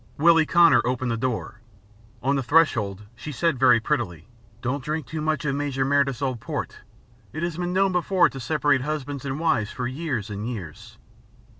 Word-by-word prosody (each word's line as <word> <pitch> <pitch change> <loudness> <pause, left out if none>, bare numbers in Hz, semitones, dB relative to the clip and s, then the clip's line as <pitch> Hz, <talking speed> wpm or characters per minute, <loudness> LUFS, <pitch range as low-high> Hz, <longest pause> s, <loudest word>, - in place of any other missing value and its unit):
Willie 165 0 +5
Connor 170 -1 +6
opened 125 0 -1
the - - 0
door. 115 -1 -3 0.6
On 140 +2 +2
the 135 - 0
threshold 120 - +2
she 150 - -7
said 155 -1 0
very 125 -3 +6
prettily: 110 - -2 0.4
"Don't 130 +2 -2
drink 155 +1 -3
too 155 +6 -5
much 155 0 -1
of 140 - 0
Major 140 -2 -1
Meredyth's 140 -1 +1
old 130 -3 -1
port. - - -5 0.5
It 155 - -4
has 170 -2 -2
been 175 0 -2
known 190 +1 +2
before 180 0 +3
now - - +4
to 135 - -8
separate 130 +1 +1
husbands 145 -1 -4
and 135 +2 -3
wives 115 -10 +1
for 125 -1 -4
years 130 -6 -3
and 105 +3 -4
years." 90 -11 -8
140 Hz, 185 wpm, -24 LUFS, 120-155 Hz, 0.6 s, Connor